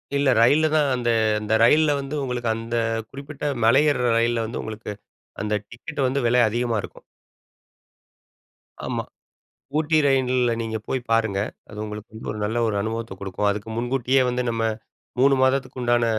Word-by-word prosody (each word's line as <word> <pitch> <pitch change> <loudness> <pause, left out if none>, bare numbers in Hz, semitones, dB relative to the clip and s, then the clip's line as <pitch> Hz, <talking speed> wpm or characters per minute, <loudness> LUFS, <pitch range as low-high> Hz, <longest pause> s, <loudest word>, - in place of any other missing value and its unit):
இல்ல 140 -1 +2
ரயில்ல 145 +7 +5
தான் 150 -2 +3
அந்த 120 -1 -1 0.3
அந்த 105 +1 -2
ரயில்ல 150 +5 +5
வந்து 140 +2 -5
உங்களுக்கு 125 -3 -2
அந்த 115 +1 -4 0.3
குறிப்பிட்ட 140 +1 -10 0.2
மலை 130 +6 +6
ஏறுற 125 -3 0
ரயில்ல 115 0 +1
வந்து, 115 - -4
உங்களுக்கு 110 -1 -6 0.5
அந்த 105 0 -2 0.2
டிக்கெட் 140 +3 -4
வந்து 135 +2 0
விலை 125 +1 +4
அதிகமா 120 0 -1
இருக்கும். - - -11 1.8
ஆமா. - - -2 0.8
ஊட்டி 155 0 +1
ரயில்ல 130 -2 +2
நீங்க 110 -1 -3
போய் 130 - -1
பாருங்க! 110 -4 +2 0.3
அது 105 - -10
உங்களுக்கு 105 +1 -8
வந்து 110 - -8
ஒரு 105 - -7
நல்ல 110 +3 -1
ஒரு 105 - -1
அனுபவத்த 115 0 -4
குடுக்கும். 100 +1 -1
அதுக்கு 100 +1 -4
முன்கூட்டியே 130 +2 +1
வந்து 125 0 0
நம்ம 115 -1 -2 0.6
3 135 +2 +5
மாதத்துக்கு 130 -1 +1
உண்டான 120 -1 +2
120 Hz, 155 wpm, -23 LUFS, 110-135 Hz, 1.8 s, மலை